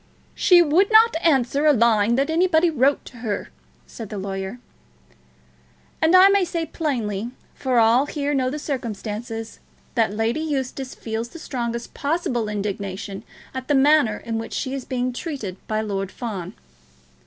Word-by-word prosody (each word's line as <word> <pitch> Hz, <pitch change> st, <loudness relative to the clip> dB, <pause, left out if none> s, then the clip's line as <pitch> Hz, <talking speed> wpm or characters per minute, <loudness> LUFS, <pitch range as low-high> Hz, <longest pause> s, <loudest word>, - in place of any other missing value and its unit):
"She 350 Hz, -2 st, +6 dB
would 345 Hz, +7 st, +3 dB
not 445 Hz, -1 st, +6 dB
answer 280 Hz, -2 st, +2 dB
a 300 Hz, -, +7 dB
line 230 Hz, -2 st, +3 dB
that 275 Hz, +4 st, +1 dB
anybody 340 Hz, 0 st, +3 dB
wrote 275 Hz, -1 st, +2 dB
to 250 Hz, -, -12 dB
her," 220 Hz, -4 st, -4 dB, 0.4 s
said 225 Hz, -4 st, -9 dB
the 210 Hz, -, -6 dB
lawyer. 195 Hz, +2 st, -4 dB, 1.4 s
"And 320 Hz, +3 st, +4 dB
I 370 Hz, +1 st, +9 dB
may 395 Hz, -1 st, +4 dB
say 335 Hz, -2 st, -2 dB
plainly, 235 Hz, -, -2 dB, 0.2 s
for 260 Hz, -2 st, -1 dB
all 235 Hz, +5 st, +4 dB
here 290 Hz, -1 st, -2 dB
know 260 Hz, -2 st, +1 dB
the 290 Hz, -, -4 dB
circumstances, 225 Hz, -4 st, -5 dB, 0.3 s
that 225 Hz, -4 st, +2 dB
Lady 225 Hz, +6 st, -1 dB
Eustace 270 Hz, -3 st, -3 dB
feels 225 Hz, +1 st, -4 dB
the 335 Hz, -, -11 dB
strongest 235 Hz, -6 st, -4 dB
possible 280 Hz, -7 st, -1 dB
indignation 200 Hz, -1 st, -4 dB, 0.3 s
at 260 Hz, -1 st, -6 dB
the 290 Hz, -, +2 dB
manner 275 Hz, -5 st, +4 dB
in 225 Hz, -1 st, -4 dB
which 225 Hz, -, -7 dB
she 265 Hz, -1 st, -3 dB
is 270 Hz, -2 st, -5 dB
being 255 Hz, -1 st, -2 dB
treated 245 Hz, -, -5 dB
by 215 Hz, 0 st, 0 dB
Lord 195 Hz, -2 st, -3 dB
Fawn." 200 Hz, -8 st, -6 dB
245 Hz, 155 wpm, -23 LUFS, 220-295 Hz, 1.4 s, I